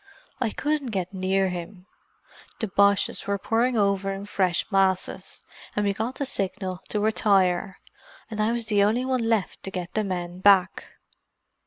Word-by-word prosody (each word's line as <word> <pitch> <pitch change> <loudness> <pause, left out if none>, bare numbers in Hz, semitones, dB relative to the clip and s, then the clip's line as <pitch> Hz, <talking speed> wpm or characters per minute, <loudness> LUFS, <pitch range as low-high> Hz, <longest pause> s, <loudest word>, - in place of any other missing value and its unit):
I 250 -4 +1
couldn't 295 +4 -1
get 190 -3 -3
near 190 0 +1
him—the 180 +4 -9
Boches 200 0 +2
were 200 0 0
pouring 230 +4 +1
over 200 -1 +1
in 195 +1 -5
fresh 185 -4 0
masses, 190 -1 0 0.3
and 210 - +1
we 200 - +1
got 225 +6 -3
the 280 - -2
signal 190 -4 -2
to 210 - -1
retire—and 200 0 -1
I 215 +2 +2
was 235 -1 -1
the 210 -2 +2
only 220 +5 +2
one 255 -3 0
left 220 -4 0
to - - -5
get 180 -2 -5
the 215 - 0
men 180 -2 -4
back. 190 -1 +4
200 Hz, 155 wpm, -25 LUFS, 190-220 Hz, 0.3 s, back